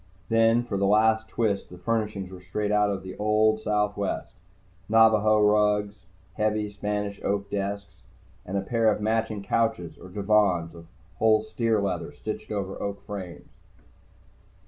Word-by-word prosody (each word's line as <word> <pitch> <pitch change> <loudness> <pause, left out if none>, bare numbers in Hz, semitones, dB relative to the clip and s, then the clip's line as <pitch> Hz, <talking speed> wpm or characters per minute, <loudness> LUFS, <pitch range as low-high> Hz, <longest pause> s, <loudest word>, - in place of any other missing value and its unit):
Then, 115 +1 +4
for 105 -5 -3
the 100 0 +1
last 110 +2 +3
twist, 105 -4 -1
the 90 - -11
furnishings 105 -1 -2
were 90 -1 -10
straight 105 +3 -3
out 105 0 +3
of 95 -1 -3
the 95 0 -8
old 110 +1 +2
Southwest 105 -2 -1 0.6
Navajo 110 -1 +5
rugs, 105 -2 +2 0.3
heavy, 105 +1 -1
Spanish 105 0 -3
oak 100 0 -2
desks, 100 0 -4 0.4
and 95 +2 -3
a - - 0
pair 115 +2 +2
of - - -2
matching 110 -1 -1
couches 100 -6 -1
or 95 - -11
divans 100 -4 +1
of 85 -1 -13 0.3
whole 110 -1 +4
steer 110 0 0
leather 90 -6 -2
stretched 105 +8 -6
over 100 -2 -4
oak 100 0 -4
frames. 95 -4 -8
105 Hz, 145 wpm, -26 LUFS, 100-110 Hz, 0.6 s, Navajo